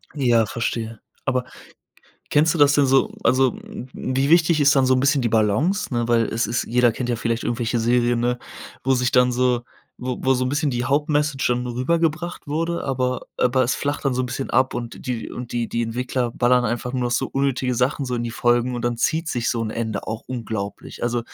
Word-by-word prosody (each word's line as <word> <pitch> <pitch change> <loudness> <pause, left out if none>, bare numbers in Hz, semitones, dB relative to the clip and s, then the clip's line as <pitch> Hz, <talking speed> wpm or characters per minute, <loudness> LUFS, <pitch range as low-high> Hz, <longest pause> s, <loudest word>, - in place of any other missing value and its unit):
Ja, 120 -5 +3
verstehe. 115 0 -3 0.3
Aber 130 -1 0 0.9
kennst 155 +2 +3
du - - -2
das 145 -1 +6
denn 145 -2 +4
so 135 +1 +3
also, 130 +1 +3 0.4
wie 135 +2 -1
wichtig 165 -2 +4
ist 140 0 +5
dann 130 -1 +4
so 130 - +4
'n 130 - +2
bisschen 140 +1 +3
die 120 - +1
Balance, 115 - +1
ne, 120 -1 0
weil 115 -1 +4
es 115 0 -1
ist 120 +3 -1
jeder 120 0 +3
kennt 125 +2 -4
ja 120 - 0
vielleicht 115 0 -1
irgendwelche 120 0 -1
Serien, 120 +1 +2
ne, 125 +1 0 0.5
wo 135 - +3
sich 125 0 +1
dann 125 -1 +4
so 125 -1 +1 0.4
w 125 0 -3
wo 130 0 +2
so 130 - 0
'n 125 - 0
bisschen 145 +1 0
die 120 0 -2
Hauptmessage 145 0 +1
dann 125 0 0
rübergebracht 165 +7 -1
wurde, 165 +3 -2
aber 130 -1 -1
aber 130 +1 +2
es 125 - 0
flacht 145 +1 -3
dann 135 -2 +1
so 130 - 0
'n - - -2
bisschen 130 +2 -4
ab 130 0 +2
und 120 -1 -6
die 125 -3 -3
und 125 -1 -7
die 120 -1 -1
die 120 - -1
Entwickler 120 +1 -2
ballern 125 +1 +3
einfach 120 +2 -2
nur 130 -1 -1
noch 120 - -1
so 125 +2 +1
unnötige 135 -2 0
Sachen 130 +4 0
so 125 -1 -3
in 120 - -2
die 120 - -3
Folgen 120 +2 +1
und 120 - -4
dann 120 -1 0
zieht 160 +7 0
sich 120 -5 -1
so 115 -2 -1
'n 110 - -3
Ende 110 -2 -3
auch 110 0 -4
unglaublich. 110 -5 -5
Also, 120 0 0
125 Hz, 220 wpm, -22 LUFS, 120-135 Hz, 0.9 s, das